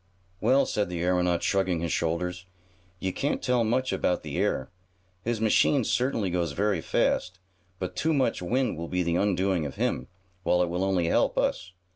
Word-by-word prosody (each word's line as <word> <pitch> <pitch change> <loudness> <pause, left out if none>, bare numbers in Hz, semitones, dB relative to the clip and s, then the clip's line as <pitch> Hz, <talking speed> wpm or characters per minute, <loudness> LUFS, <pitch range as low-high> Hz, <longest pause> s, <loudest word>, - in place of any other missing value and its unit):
"Well," 130 +5 +4
said 105 -6 -1
the 85 -1 -3
aeronaut, 90 -1 +1
shrugging 95 -3 +1
his 85 -1 -2
shoulders, 90 +2 -2 0.5
"you 95 -1 -2
can't 145 - -1
tell 125 -2 +1
much 125 +4 0
about 90 - 0
the - - -4
air. 65 - 0 0.5
His 115 +2 -2
machine 115 +5 +3
certainly 115 -6 0
goes 85 -4 -1
very 100 +1 0
fast, 90 +3 0 0.4
but 90 -1 -5
too 160 - +1
much 135 - +1
wind 125 +3 0
will 85 - -4
be 90 +1 0
the 85 0 0
undoing 95 -3 +1
of 70 - -5
him, 65 - -1 0.3
while 90 0 +2
it 85 - -2
will 90 +2 -1
only 95 -3 +1
help - - +2
us. 90 0 -1
90 Hz, 180 wpm, -27 LUFS, 90-110 Hz, 0.5 s, Well